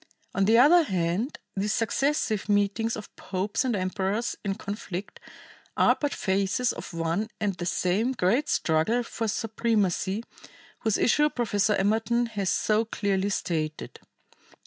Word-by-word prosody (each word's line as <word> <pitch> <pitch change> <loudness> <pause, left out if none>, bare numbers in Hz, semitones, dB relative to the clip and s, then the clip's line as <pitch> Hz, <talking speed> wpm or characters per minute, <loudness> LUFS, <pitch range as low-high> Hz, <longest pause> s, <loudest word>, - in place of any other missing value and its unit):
On 195 - +2
the 225 +3 +5
other 305 +8 +7
hand 190 - -1 0.2
these 205 +2 0
successive 230 -3 0
meetings 205 +3 +1
of 210 - -10
popes 195 +5 -2
and 250 -4 0
emperors 195 +4 -1
in 195 -2 -1
conflict 200 -2 -6 0.6
are - - +5
but 290 -1 0
phases 195 +6 0
of - - -8
one 165 +6 -1
and 205 -2 0
the 175 -1 -5
same 200 +9 +1
great 240 +7 +1
struggle 170 +10 +1
for 230 -1 -4
supremacy, 215 -2 0 0.6
whose 220 -2 +1
issue 295 +5 +3
Professor 210 -5 +1
Emerton 220 +4 +1
has 200 -4 -2
so 215 +1 +2
clearly 200 -3 -1
stated. 155 -5 -3
210 Hz, 135 wpm, -27 LUFS, 190-230 Hz, 0.6 s, other